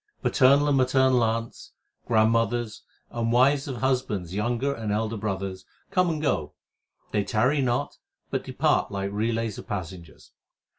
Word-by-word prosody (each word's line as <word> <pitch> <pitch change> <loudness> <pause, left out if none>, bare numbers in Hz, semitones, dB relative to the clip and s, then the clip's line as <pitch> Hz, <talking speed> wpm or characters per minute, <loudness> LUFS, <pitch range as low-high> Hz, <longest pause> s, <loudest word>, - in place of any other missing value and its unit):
Paternal 140 +2 +4
and 140 -2 +3
maternal 130 -1 +3
aunts, 115 +1 -3 0.3
grandmothers, 115 0 +1 0.3
and 115 -1 -1
wives 135 +4 +3
of 135 - -4
husbands 110 -9 -1
younger 120 +7 -1
and 110 -5 -4
elder 110 +2 -1
brothers 95 -3 -4 0.3
Come 180 -2 +2
and 160 -2 -2
go; 110 - -1 0.6
they 105 - +1
tarry 125 +8 +1
not 120 -2 -1 0.3
but - - -1
depart - - 0
like 100 0 -3
relays 110 0 -2
of - - -11
passengers. 90 -5 -7
115 Hz, 140 wpm, -26 LUFS, 105-130 Hz, 0.6 s, Paternal